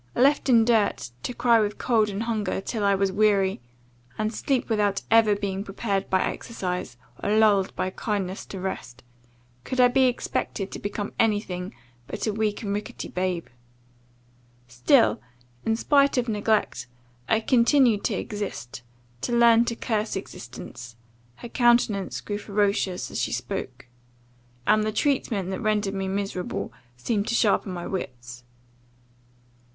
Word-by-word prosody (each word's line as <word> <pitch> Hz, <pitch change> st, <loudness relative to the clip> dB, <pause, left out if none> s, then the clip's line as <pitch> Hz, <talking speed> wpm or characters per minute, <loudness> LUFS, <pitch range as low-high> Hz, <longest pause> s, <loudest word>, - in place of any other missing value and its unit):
Left 280 Hz, +2 st, +3 dB
in 230 Hz, -3 st, +6 dB
dirt, 220 Hz, -, +1 dB
to -, -, -3 dB
cry 235 Hz, -1 st, +3 dB
with 210 Hz, -1 st, -1 dB
cold 220 Hz, -4 st, +2 dB
and 205 Hz, +2 st, -3 dB
hunger 215 Hz, -5 st, -1 dB
till 210 Hz, +2 st, -3 dB
I 200 Hz, 0 st, +4 dB
was 195 Hz, 0 st, +1 dB
weary, 195 Hz, -4 st, +2 dB, 0.6 s
and 215 Hz, +1 st, -1 dB
sleep 265 Hz, +2 st, 0 dB
without 205 Hz, -3 st, +1 dB
ever 225 Hz, -2 st, +5 dB
being 200 Hz, -1 st, -3 dB
prepared 200 Hz, -1 st, -2 dB
by 190 Hz, -1 st, +2 dB
exercise, 180 Hz, -, -4 dB, 0.2 s
or 210 Hz, +2 st, +1 dB
lulled 205 Hz, -3 st, +3 dB
by 185 Hz, -, -2 dB
kindness 195 Hz, -3 st, -3 dB
to 195 Hz, -, -7 dB
rest; 130 Hz, -9 st, -5 dB, 0.6 s
could 255 Hz, -, -4 dB
I 250 Hz, 0 st, +7 dB
be 260 Hz, +1 st, +4 dB
expected 230 Hz, -5 st, -2 dB
to -, -, -6 dB
become 205 Hz, 0 st, -4 dB
any 215 Hz, -2 st, +3 dB
thing 180 Hz, 0 st, -6 dB, 0.3 s
but -, -, -4 dB
a 215 Hz, -, 0 dB
weak 215 Hz, 0 st, -1 dB
and 200 Hz, -1 st, -2 dB
rickety 210 Hz, +1 st, -5 dB
babe? 180 Hz, -2 st, -2 dB, 1.2 s
Still, 120 Hz, -2 st, +3 dB, 0.5 s
in 225 Hz, -, +3 dB
spite 280 Hz, +3 st, +3 dB
of 250 Hz, -1 st, +1 dB
neglect, 210 Hz, -, 0 dB, 0.4 s
I 220 Hz, -, +4 dB
continued 235 Hz, -1 st, +3 dB
to -, -, +1 dB
exist, 195 Hz, -, -5 dB, 0.4 s
to -, -, -2 dB
learn 235 Hz, 0 st, +6 dB
to 235 Hz, -1 st, -2 dB
curse 215 Hz, -3 st, -2 dB
existence, 120 Hz, -8 st, -8 dB, 0.4 s
[her 240 Hz, -, -9 dB
countenance 235 Hz, -5 st, +2 dB
grew 205 Hz, 0 st, -4 dB
ferocious 200 Hz, -2 st, 0 dB
as -, -, -2 dB
she -, -, -1 dB
spoke,] 125 Hz, +2 st, -4 dB, 0.8 s
and 215 Hz, 0 st, +4 dB
the 215 Hz, -, 0 dB
treatment 215 Hz, -6 st, 0 dB
that 190 Hz, -, -4 dB
rendered 210 Hz, -3 st, 0 dB
me 195 Hz, -1 st, -2 dB
miserable, 195 Hz, -1 st, -3 dB, 0.2 s
seemed 205 Hz, -, -1 dB
to 230 Hz, -, 0 dB
sharpen 205 Hz, -3 st, +2 dB
my 175 Hz, -1 st, -5 dB
wits. 125 Hz, -8 st, -6 dB
205 Hz, 150 wpm, -25 LUFS, 190-225 Hz, 1.2 s, I